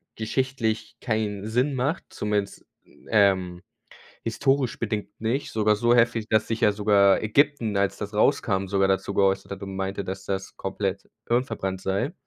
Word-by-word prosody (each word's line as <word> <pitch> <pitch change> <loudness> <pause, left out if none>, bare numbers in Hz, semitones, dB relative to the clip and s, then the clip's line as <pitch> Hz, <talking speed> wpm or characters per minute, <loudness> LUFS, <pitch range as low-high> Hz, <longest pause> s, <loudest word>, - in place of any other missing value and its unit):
geschichtlich 115 -1 -2
keinen 105 -3 -2
Sinn 125 +5 +1
macht, 140 +7 -1
zumindest, 105 -1 -3 0.2
n - - -22
ähm, 95 -4 +3 0.6
historisch 135 +2 0
bedingt 105 -3 -2
nicht, 115 +6 -2
sogar 105 -1 +2
so 120 +3 +3
heftig, 115 -2 +2
dass 110 -1 +2
sich 115 0 -3
ja 105 - +5
sogar 100 -1 +4
Ägypten, 120 -1 +2
als 100 0 +1
das 105 0 -6
rauskam, 105 -4 +2
sogar 95 0 +2
dazu 95 +1 0
geäußert 95 0 +1
hat 100 0 -6
und 95 -1 -6
meinte, 95 +1 -3
dass 95 +1 -6
das 95 0 -4
komplett 95 0 -3 0.2
hirnverbrannt 115 -6 -1
sei. 95 +1 -1
105 Hz, 155 wpm, -25 LUFS, 95-115 Hz, 0.6 s, ja